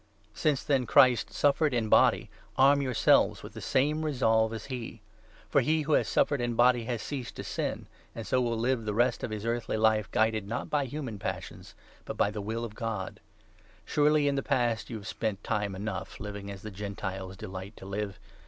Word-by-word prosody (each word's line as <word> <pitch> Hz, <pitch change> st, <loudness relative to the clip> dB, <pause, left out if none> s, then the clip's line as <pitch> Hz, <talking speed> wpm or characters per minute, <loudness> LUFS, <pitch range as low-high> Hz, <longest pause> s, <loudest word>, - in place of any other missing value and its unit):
Since, 150 Hz, -4 st, 0 dB
then, 135 Hz, -5 st, +1 dB
Christ 125 Hz, -3 st, +5 dB
suffered 145 Hz, -1 st, +2 dB
in 115 Hz, -2 st, 0 dB
body, -, -, +4 dB, 0.3 s
arm 140 Hz, +2 st, +5 dB
your 135 Hz, -, -2 dB
i -, -, -2 dB
• -, -, -7 dB
Renunciation -, -, +5 dB
seives -, -, -14 dB
with -, -, -9 dB
the -, -, -8 dB
same 150 Hz, +4 st, +1 dB
resolve 110 Hz, -7 st, +2 dB
as 110 Hz, -2 st, -6 dB
he; 125 Hz, -4 st, -6 dB, 0.5 s
for -, -, +3 dB
he 155 Hz, 0 st, +1 dB
who 155 Hz, -, -3 dB
Heathenlife. -, -, +6 dB
has -, -, 0 dB
suffered 145 Hz, -3 st, +2 dB
in 120 Hz, -1 st, -1 dB
body 120 Hz, 0 st, +4 dB
has 120 Hz, -2 st, -3 dB
ceased 135 Hz, -4 st, -5 dB
to -, -, -6 dB
sin, -, -, -3 dB, 0.3 s
and 115 Hz, -, -6 dB
so 130 Hz, -, +1 dB
will 120 Hz, -2 st, 0 dB
2 110 Hz, -, -3 dB
live 120 Hz, -2 st, 0 dB
the 105 Hz, -1 st, -2 dB
rest 120 Hz, +3 st, +2 dB
of -, -, -2 dB
his 110 Hz, 0 st, -5 dB
earthly 115 Hz, -1 st, -1 dB
life 110 Hz, -2 st, +2 dB
guided, 110 Hz, -1 st, +1 dB
not 115 Hz, -, -4 dB
by 145 Hz, -2 st, +1 dB
human 130 Hz, -6 st, -5 dB
passions, -, -, -6 dB, 0.3 s
but -, -, -6 dB
by 100 Hz, -, +2 dB
the 105 Hz, 0 st, -5 dB
will 115 Hz, +3 st, -3 dB
of 110 Hz, -, -8 dB
God. 110 Hz, -4 st, -4 dB, 0.7 s
Surely 150 Hz, 0 st, +3 dB
in 140 Hz, -, +2 dB
the 140 Hz, -, 0 dB
past 120 Hz, -5 st, 0 dB
3 120 Hz, -, -6 dB
you -, -, -3 dB
have 100 Hz, -, -10 dB
spent 105 Hz, -2 st, -3 dB
time 105 Hz, -3 st, -1 dB
enough 95 Hz, -1 st, -5 dB
living 100 Hz, -1 st, -6 dB
as 100 Hz, -1 st, -8 dB
the 110 Hz, -, -6 dB
Gentiles 95 Hz, -1 st, -5 dB
delight 95 Hz, 0 st, -8 dB
to -, -, -11 dB
live. 100 Hz, 0 st, -4 dB
115 Hz, 225 wpm, -29 LUFS, 105-130 Hz, 0.7 s, Heathenlife